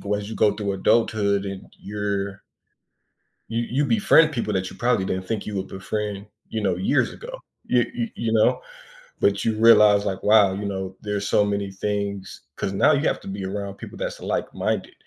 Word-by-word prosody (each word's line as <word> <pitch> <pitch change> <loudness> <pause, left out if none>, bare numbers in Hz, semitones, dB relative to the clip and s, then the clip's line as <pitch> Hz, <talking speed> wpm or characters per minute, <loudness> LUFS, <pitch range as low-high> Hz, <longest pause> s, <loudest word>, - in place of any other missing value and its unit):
go - - +3
as 105 0 -4
you 110 - -6
go 105 - +4
through 100 -1 -3
adulthood 100 -1 +2
and 95 -1 -6 0.2
you're 100 -1 -3 1.1
You 115 +1 -2
you 140 +4 +1
befriend 140 +7 +4
people 115 -5 -2
that 95 -1 -1
you - - -12
probably 120 -4 +1
didn't 95 0 -3
think 110 -3 -3
you 105 - -5
would 95 0 -3
befriend, 100 +1 -4 0.2
you 110 - -2
know, 95 -3 +1
years 130 +9 +1
ago. - - -9 0.3
You 120 -2 +2
you 120 -1 -2
you 115 -1 -2
know? 110 -1 +3 0.6
But - - +2
you 110 - +1
realize, 105 -2 +6
like, 95 -1 -2
"Wow, 105 -2 +5
you 100 +1 -4
know, 95 -1 -4
there's 105 -1 -3
so 105 - +3
many 100 -1 -2
things" 100 0 -4 0.2
'cause 100 - -2
now 150 +10 +4
you 145 +2 +1
have - - 0
to - - -12
be 95 0 -5
around 100 0 -4
people - - -10
that's, - - -4
like-minded - - -2
105 Hz, 195 wpm, -23 LUFS, 100-110 Hz, 1.1 s, realize